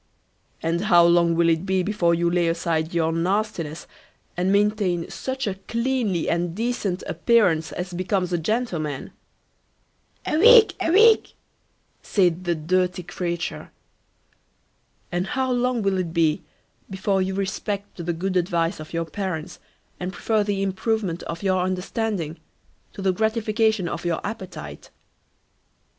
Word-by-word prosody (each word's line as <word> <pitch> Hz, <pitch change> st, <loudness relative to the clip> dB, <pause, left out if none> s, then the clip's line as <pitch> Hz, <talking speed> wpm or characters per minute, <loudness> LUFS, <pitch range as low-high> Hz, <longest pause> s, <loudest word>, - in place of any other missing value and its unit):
"And 170 Hz, +4 st, 0 dB
how 175 Hz, -4 st, +6 dB
long 170 Hz, -1 st, +4 dB
will 170 Hz, 0 st, +3 dB
it 165 Hz, 0 st, +2 dB
be 190 Hz, -1 st, +1 dB
before 175 Hz, -4 st, +1 dB
you 170 Hz, +1 st, +1 dB
lay 170 Hz, 0 st, +2 dB
aside 165 Hz, -1 st, -1 dB
your 165 Hz, -1 st, +1 dB
nastiness, 170 Hz, -2 st, -1 dB, 0.5 s
and 180 Hz, +2 st, +1 dB
maintain 200 Hz, -4 st, +1 dB
such 265 Hz, 0 st, -4 dB
a 200 Hz, -, -1 dB
cleanly 230 Hz, -7 st, 0 dB
and 170 Hz, 0 st, -1 dB
decent 215 Hz, -5 st, -2 dB
appearance 170 Hz, -3 st, +2 dB
as 180 Hz, 0 st, -5 dB
becomes 185 Hz, 0 st, -1 dB
a 175 Hz, -, +1 dB
gentleman?" 165 Hz, -, -2 dB, 1.1 s
A -, -, 0 dB
week, 450 Hz, -1 st, +8 dB
a 330 Hz, -, +1 dB
week, 430 Hz, +5 st, +5 dB, 0.7 s
said 180 Hz, -3 st, +1 dB
the 175 Hz, -1 st, +1 dB
dirty 180 Hz, +3 st, 0 dB
creature. 175 Hz, -1 st, -4 dB, 1.4 s
"And 175 Hz, +2 st, -1 dB
how 260 Hz, +4 st, -1 dB
long 245 Hz, -2 st, 0 dB
will 195 Hz, -1 st, +1 dB
it 170 Hz, -3 st, -3 dB
be 160 Hz, -2 st, +2 dB, 0.5 s
before 190 Hz, 0 st, 0 dB
you 190 Hz, 0 st, -1 dB
respect 200 Hz, -1 st, -4 dB
the 175 Hz, -, -1 dB
good 185 Hz, +3 st, -3 dB
advice 170 Hz, -1 st, 0 dB
of 155 Hz, +1 st, -10 dB
your 165 Hz, 0 st, -1 dB
parents, 175 Hz, 0 st, -5 dB, 0.4 s
and 180 Hz, +1 st, -3 dB
prefer 215 Hz, +2 st, 0 dB
the 200 Hz, -1 st, -1 dB
improvement 195 Hz, -2 st, -1 dB
of 170 Hz, +3 st, -5 dB
your 185 Hz, -2 st, +2 dB
understanding 185 Hz, -2 st, -2 dB, 0.5 s
to 195 Hz, -, -7 dB
the 190 Hz, -1 st, +2 dB
gratification 220 Hz, -1 st, +1 dB
of 170 Hz, 0 st, -4 dB
your 170 Hz, -2 st, 0 dB
appetite?" 180 Hz, -, -7 dB
185 Hz, 140 wpm, -23 LUFS, 170-210 Hz, 1.4 s, week